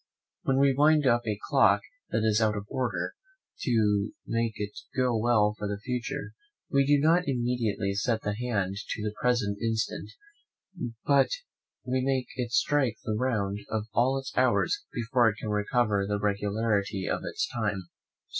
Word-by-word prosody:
When 135 - +1
we 140 0 +4
wind 150 +2 +4
up 120 -2 +3
a 105 -2 0
clock - - +4 0.3
that 110 - 0
is 110 0 +3
out 110 -1 +2
of 100 - -5
order, 125 -2 -2 0.5
to 105 -4 +1
make 115 -1 0
it 105 -1 -4 0.2
go 125 -2 +2
well 110 -2 +3
for 105 - -2
the 100 0 -3
future, 125 +5 -4 0.4
we 140 -1 +3
do 145 0 +5
not 165 +4 +3
immediately 120 -6 0
set 110 +2 0
the 105 - -1
hand 105 -4 -2
to 105 +1 -5
the 105 -1 -2
present 120 -5 +1
instant, 115 -1 -1 1.0
but 140 -1 +4 0.6
we 130 +1 0
make 130 -2 0
it 125 -2 -3
strike 130 -4 +2
the 110 - -2
round 105 -4 0
of 110 -2 -1
all 130 +3 +3
its 135 0 -6
hours, 130 - +2
before 120 0 +2
it 105 - -4
can 110 - -4
recover 105 -1 +1
the 105 0 0
regularity 100 -1 0
of - - -1
its - - -2
time. 105 -5 -2
115 Hz, 165 wpm, -28 LUFS, 105-130 Hz, 1.0 s, do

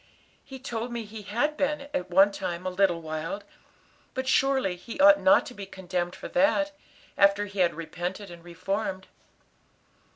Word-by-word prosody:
He 265 - -10
told 240 -2 -5
me 235 -1 -3
he 215 +1 -9
had 240 +10 -1
been, 295 0 0
at 180 -9 -2
one 195 +3 +6
time, 180 -2 -4
a 185 - -1
little 180 -3 +1
wild, 160 +5 -4 0.7
but 260 0 -3
surely 265 -8 +2
he 230 +9 -9
ought 295 +1 +8
not 290 0 +5
to - - -9
be 200 -4 -8
condemned 180 -2 -3
for - - -8
that, 295 +2 +2 0.5
after 200 +1 +4
he 200 -1 -8
had 175 -3 +3
repented 180 +4 -5
and 170 -1 -12
reformed." 190 +2 -3
200 Hz, 165 wpm, -27 LUFS, 180-260 Hz, 0.7 s, ought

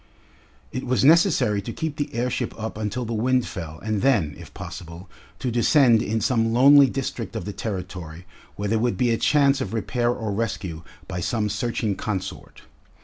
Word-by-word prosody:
It 130 - -4
was 130 +1 +1
necessary 155 - +4
to 110 - -6
keep 160 +3 -4
the 145 - -2
airship 125 +1 -2
up 110 0 -4
until 110 +3 -3
the 115 - -4
wind 125 +3 +1
fell 80 -4 -7
and 110 -2 -1
then, 105 - +2
if - - -12
possible, 85 +2 -9 0.3
to 125 - -2
descend 120 -1 +4
in 110 0 -1
some 115 -4 +1
lonely 140 +4 +7
district 120 -5 -4
of 110 - -4
the 105 - -5
Territory 90 -5 -6 0.3
where 105 - -3
there 110 +1 +2
would 120 +1 0
be 125 -2 +2
a 115 - +2
chance 140 -2 +3
of 120 - -3
repair 120 +2 0
or 110 -3 -2
rescue 95 -6 -3 0.3
by 90 -2 -4
some 105 +4 -1
searching 105 0 -1
consort. 95 -3 -5
115 Hz, 180 wpm, -24 LUFS, 100-125 Hz, 0.3 s, lonely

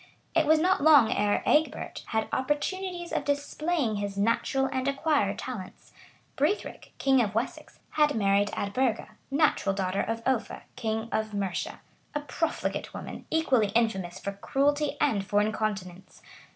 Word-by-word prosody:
It 325 -3 +3
was 315 +1 +6
not 360 +2 +2
long 285 -7 +7
ere 205 0 +1
Egbert 310 +1 +1
had 220 -1 -1
opportunities 345 +6 -2
of - - 0
displaying 285 -3 -1
his 200 -1 -4
natural 230 +5 +1
and 260 0 -2
acquired 275 -7 +1
talents. 215 -8 -7 0.4
Brithric, 305 +10 -2
king 270 -2 +4
of 210 -3 -1
Wessex, 230 - -3
had 300 -1 +3
married 200 -1 +3
Eadburga, 230 +3 0 0.2
natural 275 -9 +2
daughter 190 0 0
of 225 +1 -3
Offa, 260 -4 -1
king 220 -2 -2
of 215 -1 -1
Mercia, 195 -3 -3 0.3
a - - +1
profligate 295 +3 -3
woman, - - -8
equally 265 -9 +2
infamous 190 -7 +1
for 200 - -3
cruelty 285 +8 0
and 225 -10 +2
for 205 +1 +1
incontinence. 205 -4 -3
235 Hz, 140 wpm, -28 LUFS, 205-295 Hz, 0.4 s, long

